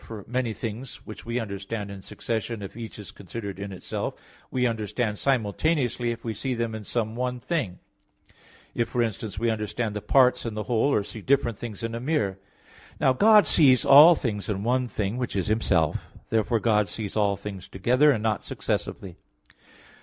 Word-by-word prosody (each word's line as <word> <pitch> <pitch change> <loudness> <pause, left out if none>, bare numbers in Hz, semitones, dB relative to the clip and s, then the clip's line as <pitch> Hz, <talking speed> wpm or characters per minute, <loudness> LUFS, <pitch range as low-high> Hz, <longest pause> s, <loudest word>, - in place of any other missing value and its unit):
For 110 -3 -9
many 125 -1 -1
things, 115 +3 -5
which 110 - -10
we 120 +1 -1
understand 100 -1 -5
in 100 -1 -8
succession 115 +1 -4
if 100 - -8
each 115 -1 -7
is 105 - -9
considered 100 0 -7
in 100 0 -5
itself, 95 - -4 0.3
we 125 -1 0
understand 110 -1 -1
simultaneously 125 0 +1
if 115 0 -5
we 115 - -2
see 125 +4 -3
them 115 -1 -2
in 110 -1 -6
some 110 +1 -2
one 125 0 -2
thing; 120 - -2 1.0
if, 115 -1 -1
for 120 - +1
instance, 110 -2 -4
we 115 +2 +1
understand 110 0 -3
the 105 - -3
parts 130 +1 +4
in 115 -2 -4
the 105 - -2
whole, 120 +4 +1
or 105 - +2
see 110 +2 -9
different 130 -3 +1
things 115 -2 -7
in 115 0 -3
a 115 - -3
mirror. 120 -9 -1 0.6
Now 130 - +4
God 210 +8 +6
sees 130 -6 +5
all 150 +5 +9
things 105 - -3
in 100 -1 -2
one 125 +2 +1
(thing), 105 0 -2
which 125 -4 -3
is 95 -3 0
Himself. 95 -8 +1 0.2
Therefore 115 +1 +2
God 105 -2 +2
sees 105 +2 -5
all 100 -2 +2
things 100 -2 -7
together, 125 +10 +3
and 115 -7 +2
not 110 -4 0
successively. 95 -4 -4
115 Hz, 185 wpm, -26 LUFS, 105-125 Hz, 1.0 s, all